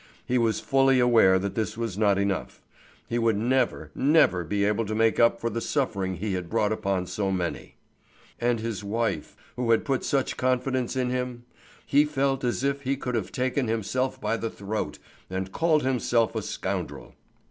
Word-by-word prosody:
He 125 0 +1
was 115 -2 +1
fully 135 -1 +3
aware 115 -6 +5
that 100 +1 -2
this 110 -1 -2
was 115 -5 -3
not 100 -1 +3
enough. 100 -1 -2 0.5
He 120 - -1
would 115 -3 +2
never, 115 - 0
never 140 - +3
be 100 +5 0
able 105 +2 +1
to 110 - -2
make 115 0 +2
up 115 0 +4
for 115 - -2
the 115 +2 -3
suffering 100 -11 -1
he 100 +3 -3
had 90 -2 -4
brought 105 -2 +1
upon 100 -4 -1
so 95 +2 -2
many. 90 -2 -3 0.6
And 120 -1 +1
his 110 -2 -4
wife, 105 -6 -2 0.2
who 125 -1 -2
had 115 - +3
put 135 -2 0
such 135 -2 0
confidence 130 0 0
in 125 -1 0
him? 125 -1 -3 0.4
He 145 +1 +4
felt 135 -2 0
as 120 -1 -1
if 140 0 0
he 135 0 -1
could 125 -2 -4
have 110 -6 -2
taken 130 0 -1
himself 125 +4 -1
by 115 -3 -1
the 115 - -3
throat 105 +1 -4 0.3
and 95 0 -4
called 160 - +2
himself 120 -4 +1
a - - -2
scoundrel. - - -4
115 Hz, 185 wpm, -26 LUFS, 100-130 Hz, 0.6 s, aware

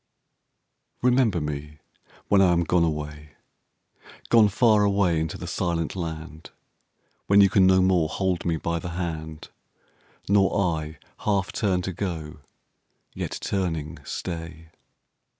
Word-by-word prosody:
Remember 125 -7 +3
me 75 0 -5 0.5
when 100 -1 +4
I 90 -2 +5
am 85 0 +2
gone 85 0 +2
away, 75 -1 -4 0.9
Gone 110 -3 +6
far 110 0 +4
away 100 -5 +2
into 80 0 -3
the - - -7
silent 85 -2 -2
land; 80 -2 -6 0.8
When 100 0 +5
you 100 -2 +6
can 95 -1 +5
no 95 0 +5
more 90 -4 +2
hold 95 0 -1
me 85 -2 0
by 85 +2 -2
the 90 - -6
hand, 80 -3 -5 0.8
Nor 100 0 +3 0.2
I 80 0 -8 0.2
half 100 -3 0
turn 95 -4 0
to 95 - -4
go 80 -5 -5 0.7
yet - - -4
turning 80 -5 -3
stay. 80 -1 -6
85 Hz, 130 wpm, -25 LUFS, 80-95 Hz, 0.9 s, Gone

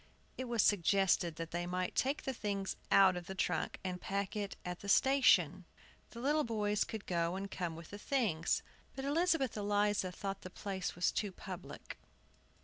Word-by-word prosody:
It 260 - -4
was 235 -3 +2
suggested 190 -3 +3
that 165 0 -6
they 175 +1 -2
might 180 0 -2
take 275 +3 0
the 265 - -2
things 200 -4 -2
out 190 -2 +6
of 175 -1 -6
the 190 - -5
trunk, - - -1
and 180 -1 -4
pack 200 0 -2
it 205 -2 -3
at 180 0 -4
the 200 - -7
station; 195 - +5 0.5
the 235 - -10
little 295 +5 +2
boys 210 -3 +1
could 220 -2 -6
go 170 0 0
and 195 +1 -5
come 175 -3 -3
with 165 0 -10
the 205 - -7
things. 205 - +1 0.3
But 270 - -4
Elizabeth 320 -2 +2
Eliza 205 -2 +1
thought 195 +1 -5
the 185 - -8
place 190 0 -4 0.2
too 205 -2 -1
public. - - -8
200 Hz, 175 wpm, -35 LUFS, 180-225 Hz, 0.5 s, out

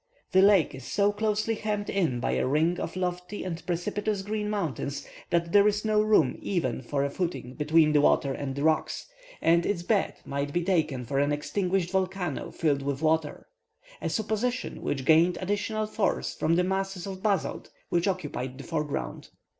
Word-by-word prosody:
The 190 - +6
lake 195 -7 +5
is 135 -1 -9
so 200 +9 +2
closely 215 +1 0
hemmed 210 -1 -2
in 165 -11 0
by - - -1
a - - +1
ring 160 +6 +2
of - - -4
lofty 180 +2 -3
and 175 -2 -5
precipitous 195 +4 -1
green 210 +1 -2
mountains, 145 - -3 0.2
that 170 -1 +1
there 205 +1 +6
is 210 +1 0
no 215 -1 +3
room 215 -11 +3
even 140 -11 -1
for 140 +3 -1
a - - -1
footing 170 -7 -3
between 155 +2 +3
the 150 -1 +4
water 140 -1 +3
and 135 -1 -4
the 140 - -2
rocks, 160 0 +1 0.4
and 170 +1 +4
its 175 -3 -1
bed 205 +1 +1
might 140 +1 -3
be 175 - +1
taken 155 -9 0
for 135 +3 -1
an 145 +1 +2
extinguished 180 +4 -1
volcano 185 -4 -1
filled 145 -4 0
with 140 +2 -3
water 155 -1 +1 0.6
a - - -1
supposition 220 +4 -2
which 135 -2 -2
gains 165 +3 +5
additional 205 +3 -1
force 215 -2 -1
from 165 - +1
the 180 - +3
masses 190 -1 -2
of 190 -1 -6
basalt 200 -5 -1 0.2
which 175 +2 +1
occupy 165 -9 -2
the 130 +2 -10
foreground. 150 -2 -3
175 Hz, 180 wpm, -28 LUFS, 150-200 Hz, 0.6 s, The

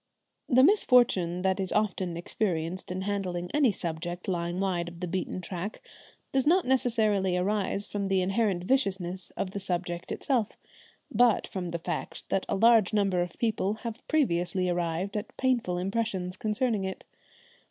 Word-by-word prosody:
The 255 0 +6
misfortune 240 - +4
that 190 0 +1
is 190 -1 -2
often 190 -5 0
experienced 175 -1 -2
in 185 +1 -3
handling 185 -3 -2
any 285 -6 +4
subject 175 0 -5
lying 175 -1 -1
wide 180 -3 0
of 170 0 -9
the 180 - -2
beaten 185 +1 -3
track 180 +3 -5 0.5
does 270 +1 +1
not 360 +3 +4
necessarily 215 -7 +2
arise 200 +1 0
from 200 -1 -3
the 190 -1 +2
inherent 195 -2 +1
viciousness 190 -6 0
of 185 - -2
the 200 - -4
subject 175 -2 -3
itself, 240 -6 -1 0.5
but 235 0 +4
from 180 -2 -5
the 170 - -2
fact 165 - -5
that 195 - 0
a - - +1
large 225 0 +5
number 195 -4 +2
of 175 -1 -4
people 215 -3 0
have 230 +1 -4
previously 185 - +1
arrived 175 +3 -1
at 210 +1 -5
painful 240 -9 +1
impressions 190 -1 -2
concerning 215 +1 0
it. 190 0 -5
190 Hz, 155 wpm, -28 LUFS, 180-220 Hz, 0.5 s, The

